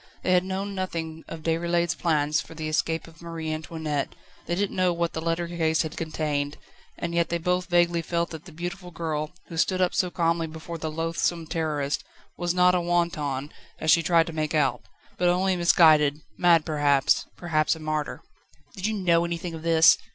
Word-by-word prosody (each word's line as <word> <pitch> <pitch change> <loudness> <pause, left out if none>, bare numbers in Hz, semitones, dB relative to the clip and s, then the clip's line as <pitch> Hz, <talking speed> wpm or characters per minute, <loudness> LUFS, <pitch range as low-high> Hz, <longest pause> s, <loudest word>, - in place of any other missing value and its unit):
They 185 - +1
had 180 0 +4
known 190 +2 -3
nothing 165 -4 -4
of 160 -1 -8
Déroulède's 170 +1 +1
plans 150 -3 +1
for 165 - -12
the 155 -1 -4
escape 160 +1 0
of 165 0 -16
Marie 165 -2 -4
Antoinette, 155 -2 -3 0.3
they 175 - 0
didn't 200 +2 -1
know 185 -1 +3
what 170 0 -1
the 160 - -3
letter 165 +1 -1
case 160 -2 +1
had 160 -1 -6
contained, 150 -3 -2 0.4
and 170 0 -3
yet 170 0 +1
they 170 - 0
both 180 +1 0
vaguely 175 -1 +3
felt 170 +1 -1
that 160 -1 -8
the 175 - -11
beautiful 175 +3 -6
girl, 160 -3 -3 0.2
who 165 - -8
stood 185 +3 +1
up 180 -1 +2
so 180 -2 +1
calmly 165 -1 0
before 160 +1 -7
the 155 - -3
loathsome 165 +1 -1
Terrorist, 150 -4 -1 0.3
was 175 0 -1
not 180 0 +4
a 180 - +2
wanton, 155 -5 -1 0.3
as 155 - +2
she 165 +2 +6
tried 165 -1 +4
to 165 - -7
make 155 0 -1
out, 135 -5 +2 0.4
but 175 0 +4
only 185 +1 +2
misguided, 155 -4 +5
mad 170 -3 +4
perhaps 145 -3 +2
perhaps 155 -2 +1
a - - -10
martyr. 155 -1 -3 0.5
"Did 195 +2 -2
you 220 - -1
know 170 -4 +3
anything 170 0 -3
of 160 - -7
this?" 165 0 +6
165 Hz, 195 wpm, -26 LUFS, 155-175 Hz, 0.5 s, she